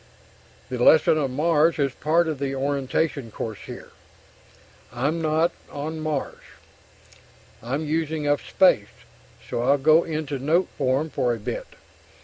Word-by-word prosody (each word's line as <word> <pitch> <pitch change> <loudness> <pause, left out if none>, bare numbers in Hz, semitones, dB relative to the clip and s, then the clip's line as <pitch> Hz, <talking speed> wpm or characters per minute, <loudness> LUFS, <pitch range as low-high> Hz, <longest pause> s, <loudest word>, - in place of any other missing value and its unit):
The 125 -1 -4
lesson 155 +2 +5
of 140 -3 0
Mars 155 +4 +2
is 140 -3 0
part 165 +4 +1
of 155 -4 -3
the 135 -1 -2
orientation 140 -1 -1
course 110 0 -6
here. - - -9 1.0
(I'm 140 +8 -1
not 160 +2 +2 0.2
on 155 +2 -5
Mars). 155 -3 -3 1.2
I'm 135 +7 -3
using 155 0 -1
up 145 0 +2
space, 145 - +2 0.4
so - - -2
I'll 140 +4 +3
go 155 +4 +5
into 155 -3 -4
note 165 +7 +1
form 140 +3 0
for 120 -1 0
a - - -9
bit. 115 +3 -5
145 Hz, 135 wpm, -24 LUFS, 135-160 Hz, 1.2 s, lesson